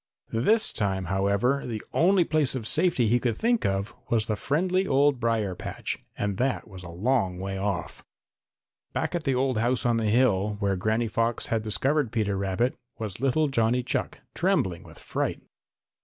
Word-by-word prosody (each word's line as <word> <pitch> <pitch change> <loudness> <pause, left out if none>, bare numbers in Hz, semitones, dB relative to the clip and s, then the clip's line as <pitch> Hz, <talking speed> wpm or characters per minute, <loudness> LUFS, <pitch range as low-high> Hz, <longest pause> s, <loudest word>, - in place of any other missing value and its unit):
This 215 - +2
time, 95 -3 -1
however, 100 +9 +1
the 110 -3 -4
only 185 +2 +4
place 155 -5 +1
of 120 -4 -4
safety 155 -3 +3
he 120 +3 +3
could 120 -3 -1
think 235 0 +1
of 100 +1 -2 0.2
was 110 -2 +2
the 110 - -1
friendly 185 - 0
old 140 -1 +3
brier 115 -5 0
patch, - - -5 0.2
and 100 -2 -2
that 130 +1 -1
was 95 -3 -10
a 90 - -9
long 95 +1 0
way 95 +1 -4
off. 100 -3 -3 0.9
Back - - -1
at 175 -2 -2
the 135 -2 +2
old 130 -2 +1
house 120 +3 0
on 120 -1 +3
the 115 - 0
hill, 105 -3 +2
where 100 -2 +1
Granny 110 +5 0
Fox 115 +2 0
had 115 - +1
discovered 130 +4 +1
Peter 105 -3 0
Rabbit, 100 +6 0 0.2
was 110 -2 -6
little 145 +3 +2
Johnny 125 -2 +1
Chuck, - - -3
trembling 85 -3 0
with - - -15
fright. - - -3
115 Hz, 175 wpm, -26 LUFS, 100-135 Hz, 0.9 s, only